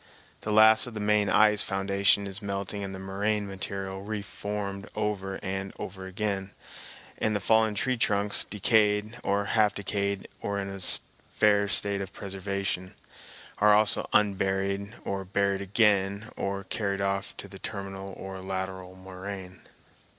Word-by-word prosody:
The 105 - -4
last 110 +2 +6
of 120 - -9
the - - -4
main 105 -1 +2
ice 105 -1 +5
foundation 100 +1 +2
is 100 +1 -5
melting 100 0 -3
and 95 -1 -5
the - - -6
moraine 100 +2 -1
material 95 0 -5
re 105 0 -4
formed 100 -1 -5
over 100 -2 -2
and 95 0 -3
over 95 -1 -7
again, 95 0 -3 0.7
and 110 -1 +1
the - - +1
fallen 110 +1 +3
tree 130 +5 0
trunks, 100 -2 +1
decayed 105 +1 +1
or 100 +1 +1
half 105 0 +2
decayed 100 -1 -2
or 100 0 -2
in 100 0 -4
a 95 - -7 0.6
fair 105 -1 +4
state 100 0 +6
of 95 -1 -6
preservation, 95 -1 -4 0.6
are 105 0 +6
also 105 0 +4
unburied 100 0 +1
and 95 -1 -4
buried 100 -1 +1
again 100 0 +2
or 100 0 -3
carried 100 0 -2
off 100 0 -2
to - - -6
the 95 0 -12
terminal 95 -1 -6
or 95 0 -7
lateral 95 -1 -5
moraine. 95 0 -8
100 Hz, 150 wpm, -28 LUFS, 95-105 Hz, 0.7 s, last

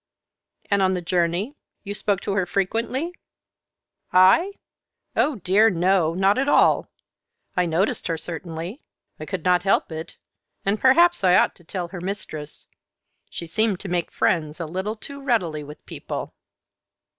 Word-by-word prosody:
"And 200 -1 +3
on 190 0 +3
the 180 - -3
journey 175 - 0 0.3
you 205 -1 -4
spoke 205 -2 0
to - - -3
her 190 -3 0
frequently?" 230 - -1 1.0
"I? 190 - +5 0.6
Oh, 300 - +2
dear, 205 +3 +4
no, 175 -3 +2
not 195 +5 +3
at 275 +2 +1
all. - - +4 0.7
I 180 -1 +2
noticed 190 +8 0
her, 165 -2 -1
certainly; 170 - -6 0.4
I - - -7
could 185 -4 -4
not 180 -1 +4
help 195 -2 +1
it, 160 0 -7 0.5
and 200 +2 +1
perhaps 340 - +5
I 180 -1 +5
ought - - +4
to 175 - -20
tell 175 0 -5
her 180 -1 -7
mistress. 165 -6 -5 0.6
She 170 - -6
seemed 210 +2 0
to 195 - -6
make 175 -1 -1
friends 155 -2 0
a 165 - -3
little 190 +7 -3
too 280 +5 -10
readily 180 - 0
with 150 +1 -12
people." - - -6
185 Hz, 155 wpm, -23 LUFS, 170-215 Hz, 1.0 s, I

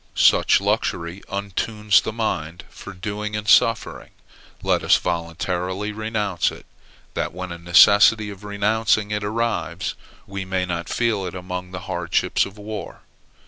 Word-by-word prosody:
Such - - +5
luxury 85 +3 -1
untunes 100 +1 +1
the - - -4
mind 85 -7 -3
for 100 - -10
doing 105 +3 -5
and 105 0 -4
suffering. 115 +1 +3 0.5
Let - - +2
us - - +5
voluntarily 90 +4 -3
renounce 105 -4 -1
it; - - -12 0.5
that - - -2
when 95 -1 -6
a 85 - -7
necessity 100 +4 +6
of 100 0 -12
renouncing 105 +1 +1
it 105 0 -1
arrives, 115 +2 -2 0.3
we 100 0 -5
may 95 -1 -1
not 85 -1 -4
feel 110 -6 0
it 90 - -7
among 90 0 -5
the 90 -1 -7
hardships 85 +1 0
of 100 +2 -14
war. 105 0 -7
100 Hz, 145 wpm, -22 LUFS, 90-105 Hz, 0.5 s, necessity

